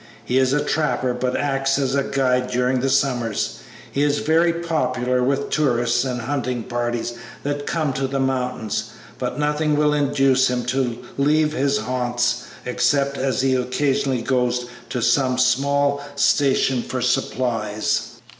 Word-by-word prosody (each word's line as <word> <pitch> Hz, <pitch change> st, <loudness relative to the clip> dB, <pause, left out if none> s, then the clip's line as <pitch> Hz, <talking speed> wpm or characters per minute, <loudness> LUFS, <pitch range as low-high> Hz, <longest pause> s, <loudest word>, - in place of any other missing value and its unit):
He 130 Hz, +2 st, +2 dB
is 130 Hz, -1 st, +2 dB
a 145 Hz, +1 st, +1 dB
trapper, 150 Hz, -5 st, 0 dB
but 125 Hz, +1 st, -1 dB
acts 135 Hz, -1 st, 0 dB
as 135 Hz, -2 st, 0 dB
guide 130 Hz, -2 st, +1 dB
during 125 Hz, +1 st, +1 dB
the 135 Hz, +2 st, 0 dB
summers. 125 Hz, -5 st, 0 dB, 0.3 s
He 140 Hz, -, -1 dB
is 145 Hz, 0 st, +2 dB
very 165 Hz, +3 st, +3 dB
popular 130 Hz, -7 st, -1 dB
with 140 Hz, +2 st, 0 dB
tourist 120 Hz, -6 st, +2 dB
and 125 Hz, -2 st, -2 dB
hunting 125 Hz, -2 st, -2 dB
parties 120 Hz, 0 st, -2 dB, 0.3 s
that 145 Hz, 0 st, -3 dB
come 155 Hz, -5 st, 0 dB
to 135 Hz, 0 st, -1 dB
the 135 Hz, +1 st, -2 dB
mountains, 125 Hz, -5 st, -1 dB, 0.3 s
but 125 Hz, +1 st, -3 dB
nothing 150 Hz, +1 st, +1 dB
will 150 Hz, 0 st, +3 dB
induce 135 Hz, -2 st, +3 dB
him 125 Hz, -1 st, -2 dB
to 125 Hz, -2 st, -1 dB, 0.2 s
leave 150 Hz, +2 st, +3 dB
his 140 Hz, -1 st, +1 dB
haunts 120 Hz, +1 st, -1 dB, 0.2 s
except 140 Hz, +3 st, +1 dB
as 130 Hz, -1 st, 0 dB
he 135 Hz, 0 st, +2 dB
occasionally 130 Hz, 0 st, 0 dB
goes 125 Hz, -1 st, 0 dB, 0.2 s
to 125 Hz, -, -2 dB
some 130 Hz, -2 st, +2 dB
small 140 Hz, +2 st, +2 dB
station 135 Hz, -2 st, +2 dB
for 125 Hz, +1 st, -4 dB
supplies." 115 Hz, -4 st, -1 dB
130 Hz, 145 wpm, -22 LUFS, 125-140 Hz, 0.3 s, very